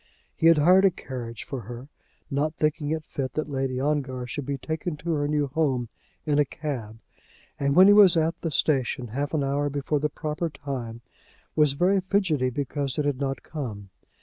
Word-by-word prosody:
He 165 - +3
had 165 -1 +7
hired 180 +6 +6
a - - +7
carriage 120 -9 -7
for 140 -6 -5
her, 120 +4 -9 0.4
not 150 +3 0
thinking 150 -1 0
it 155 0 -2
fit 130 -2 -4
that 155 0 -3
Lady 135 -2 -1
Ongar 135 -3 -1
should 130 +2 -5
be 140 -1 -1
taken 160 +2 -4
to 170 +3 -3
her 145 -2 0
new 150 -1 +1
home 130 -4 0 0.4
in 150 -1 +2
a - - +6
cab; 125 -7 -5 0.6
and 140 0 +1
when 185 - +9
he 205 - +8
was 195 -5 +7
at 160 +1 +2
the 165 - -1
station, 130 -5 0
half 140 +6 -2
an 145 - +1
hour 140 +1 0
before 145 +1 -1
the 150 +1 0
proper 155 +2 -3
time, 135 -6 -6 0.5
was 150 -3 +4
very 185 +6 +2
fidgety 180 -9 +1
because 140 +1 -3
it 150 - 0
had 145 -3 0
not 135 -2 -2
come. 105 - -6
145 Hz, 195 wpm, -26 LUFS, 130-155 Hz, 0.6 s, when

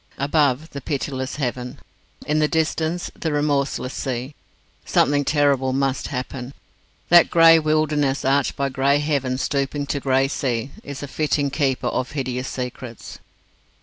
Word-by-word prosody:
Above, 145 +1 +1
the 140 - -6
pitiless 130 -2 -3
heaven. 125 -3 -3 0.5
In 150 +1 +1
the 150 - +3
distance, 160 +2 -1
the 160 - -3
remorseless 145 -3 0
sea. 130 +2 -4 0.5
Something 145 0 +2
terrible 140 -3 +2
must 135 0 0
happen. 130 0 -5 0.5
That 175 -1 +7
grey 165 -1 +7
wilderness, 155 -3 +1
arched 140 +1 +2
by 140 0 -1
grey 135 +2 +2
heaven 140 -4 -1
stooping 140 +1 -1
to 140 - -2
grey 135 0 +2
sea, 130 -2 -2
is 140 0 -7
a - - -4
fitting 145 -1 0
keeper 135 -3 0
of 130 +2 -2
hideous 130 -2 -3
secrets. 125 -2 -7
140 Hz, 140 wpm, -22 LUFS, 130-150 Hz, 0.5 s, That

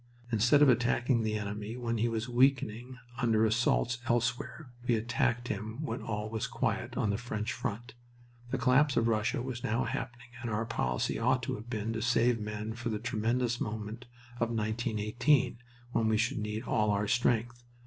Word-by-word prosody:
Instead 120 +6 +5
of - - +7
attacking 120 0 +3
the 110 -1 0
enemy 105 +2 -4
when 115 -2 -2
he 120 +2 +2
was 115 0 -2
weakening 125 -1 +1 0.2
under 110 -2 +3
assaults 120 +2 +2
elsewhere, 120 +4 -1 0.2
we 120 - +4
attacked 120 +1 0
him 110 +3 -4
when 155 - -3
all 105 -1 -3
was 110 0 -2
quiet - - -2
on 105 - +1
the 100 - -1
French 115 -1 -3
front. 115 +4 -4 0.6
The 135 - -1
collapse 130 +4 +3
of 115 - +3
Russia 110 +1 +1
was 125 -2 -5
now 115 +4 +1
happening 120 +1 -5
and 120 - -3
our 110 +1 -1
policy 65 - -1
ought 125 +2 +2
to - - -2
have 110 +3 -7
been 110 -1 -2
to 115 - -3
save 120 0 +3
men 105 +1 -4
for 120 +1 -4
the 110 - -1
tremendous 120 +2 0
moment 110 +3 -4 0.3
of 115 - +1
1918, 115 +4 +1 0.3
when 115 -2 +1
we 110 0 +3
should 110 +1 0
need 105 +2 -3
all 105 -4 +1
our 105 0 +1
strength. 120 +1 +1
115 Hz, 180 wpm, -31 LUFS, 110-120 Hz, 0.6 s, of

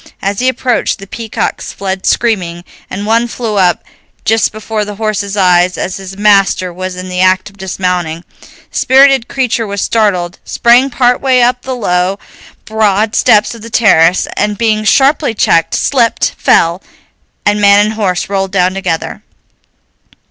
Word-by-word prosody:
As 200 0 -3
he 255 +1 +2
approached, 255 -1 -1
the 195 - -11
peacocks 225 +2 -4
fled 190 -1 -4
screaming, 180 -7 0 0.3
and 200 +2 -5
one 230 +2 +1
flew 230 -3 -4
up 180 -3 +2 0.4
just 225 0 +2
before 215 0 -4
the 205 0 -7
horse's 210 -1 -3
eyes 180 -1 +3
as 185 - -4
his 195 0 -9
master 195 -3 +2
was 185 +1 -5
in 185 0 -7
the 180 0 -4
act 185 +2 +1
of 200 - -24
dismounting. 180 -3 -3 0.5
The - - -6
spirited 265 -2 +4
creature 245 -4 -1
was 200 0 -4
startled, 190 -6 0
sprang 245 +3 +3
partway 250 0 +2
up 245 +1 +1
the 260 0 -5
low, 185 -4 -1 0.5
broad 215 0 0
steps 210 +2 +3
of 230 - -12
the 230 - -9
terrace, 185 -6 +3
and, 210 0 -1
being 215 -2 0
sharply 275 0 +2
checked, 165 -4 +1
slipped, 240 -5 +1
fell, 170 +3 +2 0.6
and 205 0 +1
man 200 0 +5
and 215 - -2
horse 190 -5 -2
rolled 195 -1 -2
down 185 -1 +1
together. 190 -4 -4
205 Hz, 155 wpm, -12 LUFS, 185-230 Hz, 0.6 s, man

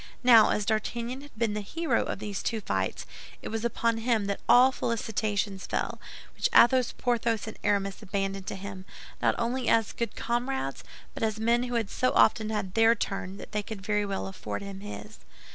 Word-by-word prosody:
Now, 230 -3 +8
as 210 - 0
D'Artagnan 235 +4 -2
had 290 -5 -15
been 220 -2 0
the 210 - -2
hero 330 +11 0
of - - -3
these 205 -1 -4
two 225 - -1
fights, 95 - -2 0.4
it - - -5
was 225 0 -3
upon 230 -1 0
him 225 -3 +1
that 200 0 -2
all 255 +2 +7
the - - -12
felicitations 210 -3 -1
fell, - - -2 0.3
which - - +1
Athos, 255 0 +6
Porthos, 235 -2 0
and 220 - -8
Aramis 200 -1 0
abandoned 195 0 -3
to - - -3
him, 190 -1 -8 0.4
not - - +3
only 240 +2 -1
as 225 -2 +3
good 235 - -3
comrades, 240 - -2 0.3
but - - -8
as 220 -1 0
men 235 +2 +3
who 245 -1 -4
had 225 -4 -1
so 255 - +1
often 215 0 +4
had 205 -4 -3
their 225 +1 +5
turn 195 -2 -4
that - - -10
they 210 -1 -1
could 205 -1 -8
very 210 0 +1
well 195 -1 -3
afford 195 +1 -5
him 200 -1 -7
his. 210 +1 -9
220 Hz, 195 wpm, -28 LUFS, 200-235 Hz, 0.4 s, Now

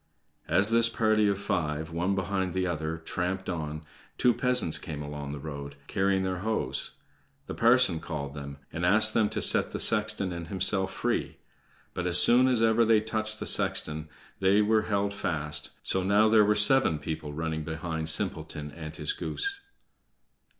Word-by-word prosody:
As 95 +7 +3
this 115 0 +6
party 110 -2 +2
of 100 -1 0
five, 80 -5 -3
one 90 +4 -1
behind 95 -1 -2
the 95 0 0
other, 80 -2 -3
tramped 90 +3 -4
on, 75 -3 -5 0.3
two 125 - +3
peasants 125 -7 +2
came 75 -2 -7
along 75 -1 -7
the 75 - -6
road, 70 -1 -8
carrying 95 -1 0
their 95 -1 -3
hoes. 110 +3 -2 0.5
The - - -6
parson 120 -7 +4
called 70 -4 -6
them, 70 -1 -8 0.2
and 80 - -4
asked 110 +5 +4
them 110 -2 +2
to - - -2
set - - +4
the - - -5
sexton 105 -4 +1
and 85 -1 -7
himself 95 +1 +3
free. - - -2 0.6
But 90 0 -3
as 85 0 +5
soon 125 +2 +5
as 125 -3 +2
ever 115 +1 +3
they 110 -1 +4
touched 110 0 -2
the - - -4
sexton 75 0 -1 0.3
they 95 +2 +3
were 110 +1 +2
held 100 0 0
fast, 75 -6 -2
so 95 - -1
now 100 +3 +3
there 110 -1 +5
were 105 +1 +2
seven 105 - +4
people 75 0 -6
running 80 +1 -3
behind 80 0 -4
Simpleton 75 -2 -1
and 80 0 -9
his - - -2
goose. 400 0 -3
95 Hz, 170 wpm, -27 LUFS, 80-110 Hz, 0.6 s, this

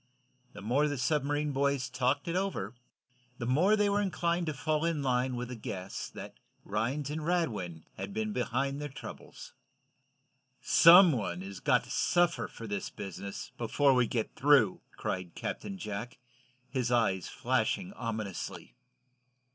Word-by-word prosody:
The 100 - -10
more 135 +8 +2
the 145 -1 -2
submarine 145 +3 0
boys 140 -1 +1
talked 130 +4 0
it 170 - -1
over, 195 -6 -2 0.6
the 120 - -4
more 165 - +4
they 205 -1 +2
were 205 0 +2
inclined 170 -2 0
to 155 - -1
fall 155 +3 0
in 165 -4 0
line 125 -1 +1
with 125 0 -4
the 125 - -5
guess 95 -4 -6
that - - -9 0.3
Rhinds 130 +8 -1
and 155 +1 -3
Radwin 105 - -1
had - - -5
been 215 +1 -2
behind 135 - -1
their 145 - -4
troubles. 135 - -10 1.1
"Some 175 +1 +8
one 100 -9 -2
has 95 -1 -7
got - - +3
to - - -11
suffer 175 -1 +2
for 115 - -10
this 100 -2 -3
business, 100 +3 -7
before 135 +4 +3
we 125 -2 +3
get 115 -1 -2
through!" 135 -9 +4 0.2
cried 90 -2 -4
Captain 195 -1 -5
Jack, 110 - -5 0.5
his 125 -2 -1
eyes 100 -7 +2
flashing 130 - -1
ominously. 110 - -5
130 Hz, 150 wpm, -31 LUFS, 115-160 Hz, 1.1 s, Some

